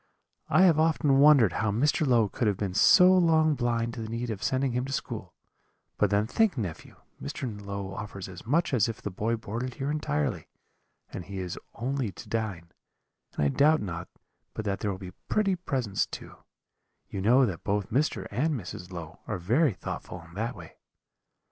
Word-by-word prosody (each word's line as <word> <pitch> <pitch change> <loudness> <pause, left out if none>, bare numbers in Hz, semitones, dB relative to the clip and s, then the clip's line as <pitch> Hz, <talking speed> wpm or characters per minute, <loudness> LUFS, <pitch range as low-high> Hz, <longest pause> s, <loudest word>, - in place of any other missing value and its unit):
I 185 - +5
have 165 -5 +5
often 155 -4 +3
wondered 140 - +6
how 110 - 0
Mr. 145 +8 +1
Low 115 -4 +4
could 110 +3 -1
have 100 -3 +1
been 95 -2 -2
so 180 - +7
long 160 -4 +4
blind 120 -3 -1
to 115 - -6
the 110 - -5
need 115 +1 -3
of 105 -2 -5
sending 130 0 0
him 125 +1 -1
to 135 - -6
school; - - -5 0.6
but 105 - +3
then 100 +1 +2
think, 210 - +1
nephew, 90 -9 -5 0.3
Mr. - - -5 0.2
Low 100 -1 -5
offers 100 -2 -6
as 95 -2 -10
much 150 +6 +1
as 115 -2 +3
if 115 - -5
the 105 - -5
boy 110 +5 -1
boarded 115 +3 -5
here 135 +2 -2
entirely, 75 - -1 0.7
and 90 - -6
he 100 +1 -7
is 90 -2 -4 0.2
only 125 -1 -2
to 110 - -11
dine; 105 -7 -3 0.6
and 75 - +1
I - - +3
doubt 150 - +4
not 85 -5 -5 0.5
but 110 - -4
that 100 -1 -1
there 105 - -1
will 95 - -3
be 95 -1 -8 0.2
pretty 200 -3 +2
presents 130 - -1
too - - -9 0.7
you 95 - -5
know 125 +6 +5
that 95 -7 -4
both 100 -1 -1
Mr. 145 +5 0
and 145 +9 0
Mrs. 95 -4 -7
Low 85 -1 -8
are 105 - -2
very 120 - +2
thoughtful 90 - -6
in 80 - -17
that 115 +6 -3
way.' - - -12
115 Hz, 190 wpm, -28 LUFS, 100-140 Hz, 0.7 s, so